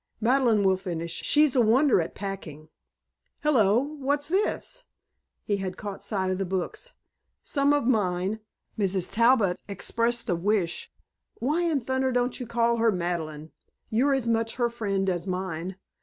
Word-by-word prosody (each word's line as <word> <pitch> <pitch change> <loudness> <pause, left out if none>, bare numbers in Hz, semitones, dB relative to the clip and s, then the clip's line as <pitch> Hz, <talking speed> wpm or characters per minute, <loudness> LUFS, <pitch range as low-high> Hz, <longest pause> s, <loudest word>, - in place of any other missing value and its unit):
"Madeleine 235 -2 +3
will 190 -1 +3
finish. 170 -3 -4
She's 300 -3 +3
a 250 - +5
wonder 240 - +4
at 165 - -6
packing. 170 -6 -7 0.7
Hello! 225 -9 +4 0.2
What's 285 +2 0
this?" 425 +6 -1 0.6
He 205 - 0
had 190 -1 -4
caught 205 -2 -7
sight 190 -3 -1
of 185 - -2
the - - +1
books. 190 - -4 0.5
"Some 280 -1 +2
of 290 -3 +2
mine. 200 -3 +1 0.4
Mrs. 190 -2 0
Talbot 230 -4 +3
expressed 230 +4 -1
a 185 - +1
wish 180 -1 -1 0.2
" - - -58
"Why 300 +8 0
in 325 -5 +1
thunder 260 +2 0
don't 245 0 0
you 250 - -5
call 235 0 +1
her 225 0 +3
Madeleine? 160 -4 -3 0.4
You're 270 +5 +3
as 260 -3 -2
much 225 0 0
her 240 -1 +1
friend 200 -4 -2
as 180 -1 -1
mine.... 185 -1 -3
215 Hz, 155 wpm, -26 LUFS, 185-255 Hz, 0.7 s, a